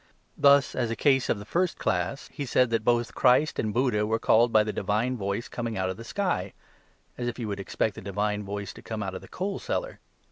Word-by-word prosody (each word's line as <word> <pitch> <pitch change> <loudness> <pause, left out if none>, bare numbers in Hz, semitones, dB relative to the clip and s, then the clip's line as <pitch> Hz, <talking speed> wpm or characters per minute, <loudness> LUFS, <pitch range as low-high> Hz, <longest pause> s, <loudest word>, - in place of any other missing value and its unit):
Thus, 140 -1 +5
as 120 -3 -1
a 115 - -2
case 135 -1 +2
of - - +2
the 100 - -9
first 175 - 0
class, 90 +9 -1
he 145 - -4
said 125 -2 +2
that 115 -1 +1
both 120 0 +1
Christ 130 +4 +3
and 110 - 0
Buddha 120 -3 +1
were 110 +1 +1
called 115 +1 +4
by 110 -1 +5
the 105 0 -3
divine 105 +6 0
voice 100 +1 -3
coming 115 -3 -4
out 95 0 0
of 95 - -7
the 115 - -8
sky, 175 - -2 0.7
as 120 - -2
if 120 - -3
you 120 -3 -4
would 100 -1 -4
expect 105 +2 -1
the - - -9
divine 105 +2 -1
voice 100 0 -5
to - - -12
come 110 -2 -4
out 95 -1 -4
of 95 - -6
the - - -13
coal 195 +2 -3
cellar. - - -3
115 Hz, 240 wpm, -27 LUFS, 100-125 Hz, 0.7 s, Thus